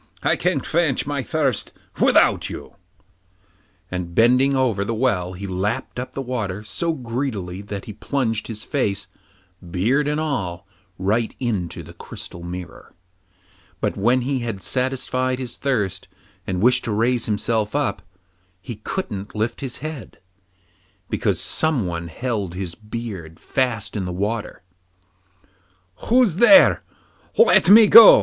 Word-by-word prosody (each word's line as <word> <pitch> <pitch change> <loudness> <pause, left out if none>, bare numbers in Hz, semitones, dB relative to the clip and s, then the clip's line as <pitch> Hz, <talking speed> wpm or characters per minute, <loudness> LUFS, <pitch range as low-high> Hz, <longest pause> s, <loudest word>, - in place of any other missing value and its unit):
'I - - +3
can - - 0
quench 160 -5 0
my 145 -1 -2
thirst 135 -5 -1 0.3
without - - +4
you,' - - -8 1.2
and 90 -2 -4
bending 125 +4 +4
over 120 -7 +1
the 115 +3 -2
well 95 -7 0
he 95 +2 -7
lapped 100 +6 -2
up 130 +1 -6
the 135 - -4
water 105 -6 -3
so 135 +11 -2
greedily 115 - -4
that 100 -1 -7
he 105 - -7
plunged 115 -1 -2
his 110 -2 -7
face, 105 -9 -1 0.6
beard 120 - +1
and 150 +1 0
all, 95 - -3 0.3
right 105 +5 0
into 105 -9 -3
the - - -12
crystal 85 - -9
mirror. 85 -1 -8 0.8
But - - -1
when 120 +6 +2
he 130 +2 -1
had 115 -5 -4
satisfied 130 0 -1
his 125 -2 -6
thirst, 105 -9 -1 0.4
and 90 +1 -1
wished 125 +1 +4
to 115 - -2
raise 115 +3 +1
himself 110 +1 -1
up, 145 -9 0 0.6
he 100 +5 -8
couldn't 105 - -5
lift 110 +2 -2
his 130 -3 -4
head, 155 -6 -7 0.9
because - - 0
someone 95 - 0
held 100 -1 -3
his 90 -2 -4
beard 105 -6 -7
fast 115 -6 -1
in 100 -3 -2
the 90 - -4
water. 100 +1 -3 1.4
'Who's 235 -8 +4
there? 275 +6 +7 0.6
let 465 - +6
me 220 +2 +10
go! 225 +1 +10
115 Hz, 135 wpm, -22 LUFS, 100-130 Hz, 1.4 s, me